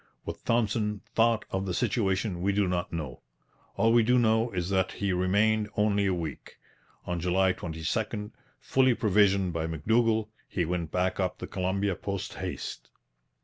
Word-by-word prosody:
What -, -, -7 dB
Thompson 105 Hz, -2 st, +1 dB
thought 115 Hz, -1 st, +3 dB
of 95 Hz, +1 st, -2 dB
the 90 Hz, -, -1 dB
situation 100 Hz, -5 st, 0 dB
we 100 Hz, +2 st, +1 dB
do 100 Hz, -1 st, +2 dB
not 90 Hz, -1 st, -1 dB
know. 75 Hz, -7 st, -5 dB, 0.5 s
All 115 Hz, 0 st, +3 dB
we 120 Hz, -, +6 dB
do 125 Hz, +3 st, +3 dB
know 110 Hz, 0 st, +3 dB
is 90 Hz, -2 st, -3 dB
that 95 Hz, -1 st, +1 dB
he 100 Hz, -2 st, -1 dB
remained 105 Hz, +4 st, +2 dB
only 105 Hz, -1 st, +2 dB
a 95 Hz, -, +2 dB
week. 80 Hz, -5 st, -6 dB, 0.5 s
On 90 Hz, -1 st, -2 dB
July 95 Hz, +2 st, +2 dB
22, 105 Hz, +6 st, -3 dB, 0.3 s
fully 130 Hz, -2 st, +3 dB
provisioned 100 Hz, -4 st, +3 dB
by 80 Hz, 0 st, -2 dB
M'Dougall, 110 Hz, +7 st, +1 dB, 0.2 s
he 90 Hz, -, -1 dB
went 85 Hz, -1 st, -2 dB
back 90 Hz, +1 st, 0 dB
up 90 Hz, -1 st, -1 dB
the -, -, -6 dB
Columbia 95 Hz, +1 st, -1 dB
post 100 Hz, +1 st, -4 dB
haste. -, -, -6 dB
100 Hz, 160 wpm, -28 LUFS, 90-110 Hz, 0.5 s, we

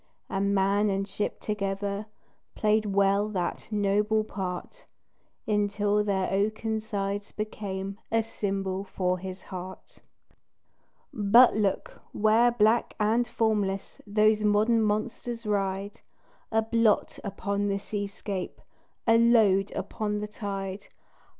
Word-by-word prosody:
And 200 Hz, +1 st, +1 dB
man 200 Hz, +2 st, +2 dB
and 195 Hz, 0 st, -1 dB
ship 205 Hz, +1 st, -3 dB
together 200 Hz, 0 st, -3 dB, 0.5 s
Played 215 Hz, 0 st, +2 dB
well 200 Hz, +1 st, +2 dB
that 180 Hz, -4 st, -3 dB
noble 210 Hz, +1 st, +1 dB
part, 190 Hz, -, -6 dB, 0.6 s
Until 210 Hz, 0 st, +1 dB
their 195 Hz, -2 st, 0 dB
oaken 220 Hz, +2 st, 0 dB
sides 200 Hz, -1 st, -3 dB
became 200 Hz, -2 st, -5 dB
A 225 Hz, 0 st, +2 dB
symbol 195 Hz, -3 st, -3 dB
for 185 Hz, -2 st, -1 dB
his 185 Hz, +1 st, -7 dB
heart. 185 Hz, 0 st, -9 dB, 1.1 s
But 225 Hz, +4 st, +6 dB
look! 205 Hz, -3 st, -1 dB
where 220 Hz, +3 st, +4 dB
black 230 Hz, 0 st, +2 dB
and 225 Hz, +3 st, +2 dB
formless 210 Hz, -4 st, -1 dB
Those 215 Hz, +1 st, +3 dB
modern 215 Hz, +2 st, +3 dB
monsters 225 Hz, +2 st, -2 dB
ride 200 Hz, -1 st, -2 dB, 0.5 s
A 225 Hz, 0 st, +2 dB
blot 225 Hz, -1 st, +2 dB
upon 200 Hz, 0 st, -2 dB
the 200 Hz, 0 st, 0 dB
seascape, 200 Hz, -2 st, -5 dB, 0.5 s
A 230 Hz, 0 st, +5 dB
load 215 Hz, -5 st, +4 dB
upon 210 Hz, -2 st, -3 dB
the 210 Hz, -, -4 dB
tide. 195 Hz, -2 st, -5 dB
205 Hz, 110 wpm, -27 LUFS, 195-215 Hz, 1.1 s, But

